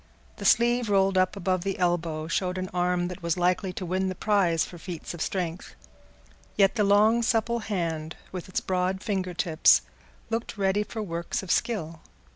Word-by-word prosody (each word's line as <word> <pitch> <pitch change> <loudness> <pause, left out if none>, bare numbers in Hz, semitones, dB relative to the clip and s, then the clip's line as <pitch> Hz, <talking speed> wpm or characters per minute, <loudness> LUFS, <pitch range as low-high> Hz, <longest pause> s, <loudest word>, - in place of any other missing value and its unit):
The - - -7
sleeve 240 -1 +3
rolled 195 -1 +3
up 185 +1 +2
above 185 -2 -1
the 195 0 -2
elbow 170 -3 0
showed 180 +2 -1
an 185 0 -4
arm 180 0 +1
that 180 +1 -7
was 170 0 -1
likely 180 +1 +1
to 185 - -5
win 190 +2 0
the 185 - -4
prize 185 -5 +2
for 175 - -11
feats 175 -1 -7
of 170 - -8
strength; 180 -2 -3 0.8
yet 195 -2 +5
the 215 - +1
long 210 +3 +4
supple 235 0 +1
hand, 165 -7 -3 0.2
with 185 0 -7
its 185 - -1
broad 185 +1 -1
finger 190 -5 -2
tips, 165 -2 +4 0.5
looked 225 -1 -3
ready 195 +1 +1
for 220 +1 -5
works 170 0 -3
of 190 - -3
skill. 165 -8 -1
185 Hz, 180 wpm, -27 LUFS, 175-200 Hz, 0.8 s, yet